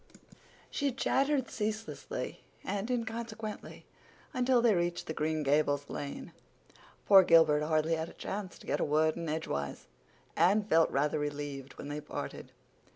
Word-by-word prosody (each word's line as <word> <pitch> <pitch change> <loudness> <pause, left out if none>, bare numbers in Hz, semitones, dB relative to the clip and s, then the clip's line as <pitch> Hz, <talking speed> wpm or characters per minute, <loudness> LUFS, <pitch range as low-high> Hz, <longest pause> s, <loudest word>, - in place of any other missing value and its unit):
She 280 -1 0
chattered 270 +1 +1
ceaselessly 220 0 -4 0.2
and 205 +3 -3
inconsequently 225 -2 -4 0.5
until 255 -1 +3
they 235 -2 +4
reached 175 -1 -1
the 160 - -4
Green 155 0 -1
Gables 145 0 +1
lane. 140 -1 -6 0.7
Poor 195 -2 +9
Gilbert 160 -4 +5
hardly 155 +1 +1
had 160 0 -2
a - - -13
chance 195 -2 -5
to - - -15
get - - -1
a - - +1
word 155 +1 +2
in 170 -2 -4
edgewise. 70 - -3 0.5
Anne 205 +4 +4
felt 165 -5 +4
rather 150 +2 +1
relieved 145 -2 -5
when 145 - -7
they 150 +1 -4
parted. - - -6
165 Hz, 145 wpm, -31 LUFS, 150-220 Hz, 0.7 s, Poor